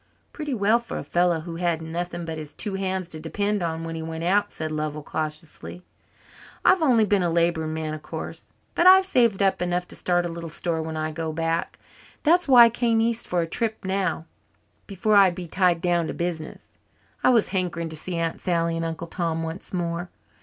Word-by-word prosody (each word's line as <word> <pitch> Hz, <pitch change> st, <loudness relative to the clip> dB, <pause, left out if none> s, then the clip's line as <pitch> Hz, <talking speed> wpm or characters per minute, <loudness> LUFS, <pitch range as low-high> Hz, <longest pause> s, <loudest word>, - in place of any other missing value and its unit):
"Pretty 295 Hz, -4 st, -3 dB
well 215 Hz, +2 st, +3 dB
for 235 Hz, -, -6 dB
a -, -, -4 dB
fellow 175 Hz, -2 st, +1 dB
who 165 Hz, 0 st, -7 dB
had 170 Hz, -2 st, 0 dB
nothing 170 Hz, +1 st, -4 dB
but 160 Hz, -1 st, -5 dB
his 155 Hz, -1 st, -9 dB
two 205 Hz, -2 st, -2 dB
hands 190 Hz, -2 st, -2 dB
to 160 Hz, -, -7 dB
depend 205 Hz, +5 st, -1 dB
on 165 Hz, -1 st, -2 dB
when 165 Hz, 0 st, -5 dB
he 160 Hz, -, -5 dB
went 160 Hz, 0 st, -5 dB
out," 195 Hz, +4 st, +2 dB
said 155 Hz, -1 st, -5 dB
Lovell 155 Hz, -1 st, -3 dB
cautiously. 155 Hz, +3 st, -6 dB, 0.8 s
"I've 370 Hz, -, +5 dB
only 245 Hz, -8 st, +4 dB
been 205 Hz, -1 st, +2 dB
a 175 Hz, -, +1 dB
labouring 165 Hz, -2 st, +1 dB
man, 155 Hz, -1 st, -3 dB
of 155 Hz, -, -6 dB
course, -, -, -7 dB, 0.3 s
but 345 Hz, -, +4 dB
I've 380 Hz, +1 st, +8 dB
saved 235 Hz, -, +2 dB
up 195 Hz, -2 st, +2 dB
enough 180 Hz, 0 st, -1 dB
to -, -, -6 dB
start 175 Hz, -1 st, +1 dB
a 170 Hz, -, -3 dB
little 165 Hz, 0 st, -6 dB
store 165 Hz, +1 st, -2 dB
when 160 Hz, 0 st, -5 dB
I 155 Hz, 0 st, -2 dB
go 160 Hz, 0 st, -3 dB
back. 165 Hz, +1 st, -2 dB, 0.5 s
That's 345 Hz, +2 st, +4 dB
why 250 Hz, -3 st, +9 dB
I -, -, +4 dB
came 230 Hz, -1 st, +1 dB
east 230 Hz, +1 st, 0 dB
for 175 Hz, -1 st, +1 dB
a -, -, 0 dB
trip 220 Hz, +5 st, -2 dB
now 190 Hz, -4 st, -1 dB, 0.6 s
before 205 Hz, +2 st, +1 dB
I'd 195 Hz, -3 st, +6 dB
be 180 Hz, -, -6 dB
tied 175 Hz, 0 st, +2 dB
down 175 Hz, -2 st, +1 dB
to -, -, -5 dB
business. 170 Hz, -2 st, -5 dB, 0.4 s
I -, -, +5 dB
was 235 Hz, -4 st, +4 dB
hankering 175 Hz, -3 st, -2 dB
to 160 Hz, -, -7 dB
see 175 Hz, +3 st, -3 dB
Aunt 165 Hz, -1 st, -2 dB
Sally 170 Hz, -2 st, 0 dB
and 165 Hz, -, -2 dB
Uncle 165 Hz, +1 st, -4 dB
Tom 165 Hz, -1 st, -2 dB
once 165 Hz, +3 st, -6 dB
more. 175 Hz, -1 st, -3 dB
175 Hz, 210 wpm, -24 LUFS, 165-195 Hz, 0.8 s, why